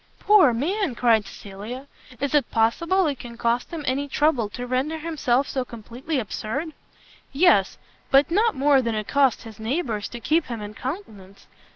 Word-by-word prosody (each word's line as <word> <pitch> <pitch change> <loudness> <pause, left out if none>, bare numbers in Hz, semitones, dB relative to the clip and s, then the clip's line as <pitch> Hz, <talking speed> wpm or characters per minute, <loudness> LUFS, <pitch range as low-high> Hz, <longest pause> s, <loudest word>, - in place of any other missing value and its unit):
"Poor 405 -10 +6
man!" 305 - -1
cried 225 -5 +3
Cecilia, 210 +7 -8 0.3
"is 280 +1 -2
it 295 -2 +2
possible 335 +12 +2
it 285 -4 -2
can 235 -1 -9
cost 235 +1 0
him 330 -3 -6
any 280 +1 -1
trouble 275 -7 +1
to 245 +4 -6
render 260 +6 -1
himself 285 -5 0
so 260 - -2
completely 240 +6 -6
absurd?" 260 - -4 0.6
"Yes; 270 - +3 0.3
but 275 +3 +4
not 435 +5 +2
more 275 0 +4
than 230 -3 -2
it 215 -1 -3
costs 275 -3 +2
his 220 -2 -11
neighbours 225 -3 -2
to 240 - -7
keep 315 +6 +1
him 235 -3 -5
in 210 0 -7
countenance. 215 - -8
260 Hz, 170 wpm, -24 LUFS, 230-305 Hz, 0.6 s, Poor